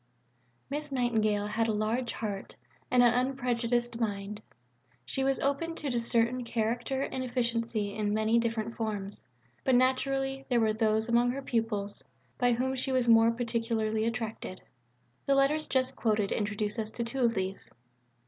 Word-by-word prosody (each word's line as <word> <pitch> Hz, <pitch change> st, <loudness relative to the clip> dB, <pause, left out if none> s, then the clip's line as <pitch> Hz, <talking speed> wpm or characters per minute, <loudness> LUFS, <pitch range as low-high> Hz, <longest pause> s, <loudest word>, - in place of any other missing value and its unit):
Miss 295 Hz, +1 st, -4 dB
Nightingale 220 Hz, -5 st, +1 dB
had 220 Hz, +2 st, 0 dB
a -, -, +2 dB
large 225 Hz, +3 st, -1 dB
heart 205 Hz, -3 st, -5 dB, 0.3 s
and 250 Hz, -1 st, +5 dB
an 240 Hz, -1 st, +6 dB
unprejudiced 245 Hz, -2 st, 0 dB
mind; 205 Hz, -1 st, -3 dB, 0.6 s
she 270 Hz, -, -1 dB
was 270 Hz, -1 st, +1 dB
open 330 Hz, +4 st, 0 dB
to 290 Hz, -4 st, -3 dB
discern 235 Hz, +1 st, +1 dB
character 240 Hz, +4 st, -1 dB
and 260 Hz, -1 st, -3 dB
efficiency 235 Hz, -4 st, -1 dB
in 210 Hz, -1 st, -1 dB
many 220 Hz, +2 st, +3 dB
different 230 Hz, -1 st, -2 dB
forms; 205 Hz, -, -4 dB, 0.4 s
but 260 Hz, -, +3 dB
naturally 270 Hz, +1 st, +1 dB
there 245 Hz, -2 st, +3 dB
were 220 Hz, -1 st, +3 dB
those, 220 Hz, 0 st, +1 dB
among 240 Hz, +1 st, +3 dB
her 270 Hz, +3 st, -2 dB
pupils, 215 Hz, -5 st, -2 dB, 0.4 s
by 245 Hz, -1 st, +4 dB
whom 260 Hz, +3 st, 0 dB
she 265 Hz, +1 st, -1 dB
was 255 Hz, -2 st, +2 dB
more 225 Hz, 0 st, +7 dB
particularly 230 Hz, -2 st, -1 dB
attracted. 225 Hz, -5 st, -4 dB, 0.6 s
The 275 Hz, -, +4 dB
letters 285 Hz, +3 st, +2 dB
just 260 Hz, 0 st, +1 dB
quoted 210 Hz, -3 st, +1 dB
introduce 210 Hz, +1 st, -1 dB
us 215 Hz, -1 st, -2 dB
to 235 Hz, -, -3 dB
two 235 Hz, +4 st, -4 dB
of 230 Hz, -1 st, +3 dB
these. 190 Hz, 0 st, -3 dB
235 Hz, 155 wpm, -30 LUFS, 215-255 Hz, 0.6 s, more